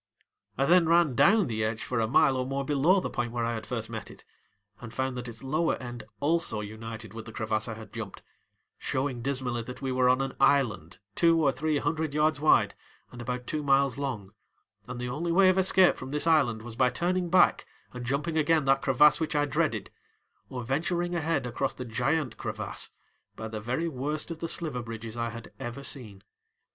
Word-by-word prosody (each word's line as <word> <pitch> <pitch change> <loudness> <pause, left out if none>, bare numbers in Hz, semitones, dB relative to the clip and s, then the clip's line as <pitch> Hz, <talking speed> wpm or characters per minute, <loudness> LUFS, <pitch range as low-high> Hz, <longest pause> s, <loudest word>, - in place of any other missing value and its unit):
I 135 - +2
then 170 +1 +5
ran 170 -4 +4
down 185 - +5
the 110 -5 -2
edge 110 +1 -2
for 125 - -2
a 110 - +1
mile 130 +3 +4
or 130 - 0
more 135 +1 -3
below 150 +7 +3
the - - -3
point 120 -3 -2
where 120 -1 -1
I 120 - -1
had 110 -1 -6
first - - -3
met - - -6
it, - - -14 0.5
and 115 -2 -9
found 130 +1 -2
that 125 0 -5
its 115 0 -10
lower 155 +5 +1
end 120 -3 -8
also 160 -7 0
united 110 0 -8
with 110 -1 -8
the 110 - -9
crevasse 110 0 -2
I 115 - -4
had 110 0 -12
jumped, 110 -4 -7 0.6
showing 130 -2 -2
dismally 125 -2 -2
that 125 +2 -8
we 135 - -1
were 130 0 +3
on 130 +1 +4
an 135 - -2
island 120 - +2 0.2
two 165 -1 +4
or 145 -4 +3
three 150 +3 -1
hundred 155 -1 -1
yards 150 -1 +2
wide 155 - +4 0.4
and 120 - -9
about 125 +1 -4
two 155 +3 -2
miles 140 -2 +2
long 110 -8 -4 0.5
and 125 -1 -6
the 125 - -3
only 155 +7 -2
way 185 +2 +6
of 185 0 +3
escape 190 -1 +5
from 130 - -7
this 150 +3 +1
island 135 -9 +3
was 120 -1 -8
by 125 +1 +3
turning 180 +4 -1
back 185 - +4 0.3
and 125 0 -6
jumping 150 +6 -1
again 155 -1 +2
that 135 0 +3
crevasse 150 +4 +5
which 160 -2 -2
I 145 0 +3
dreaded, 145 - -1 0.6
or 125 -2 -5
venturing 170 +7 -1
ahead 160 -5 0
across 125 +3 -2
the 125 - -6
giant 135 +5 -1
crevasse - - -3 0.5
by 110 - -6
the 110 -1 -5
very 125 +9 -1
worst 150 +3 -3
of 165 - -6
the 165 - -3
sliver 155 -7 -2
bridges 115 -1 -7
I 115 0 -2
had 115 0 -9
ever 135 +1 -6
seen. 105 -9 -7
135 Hz, 210 wpm, -28 LUFS, 120-155 Hz, 0.6 s, way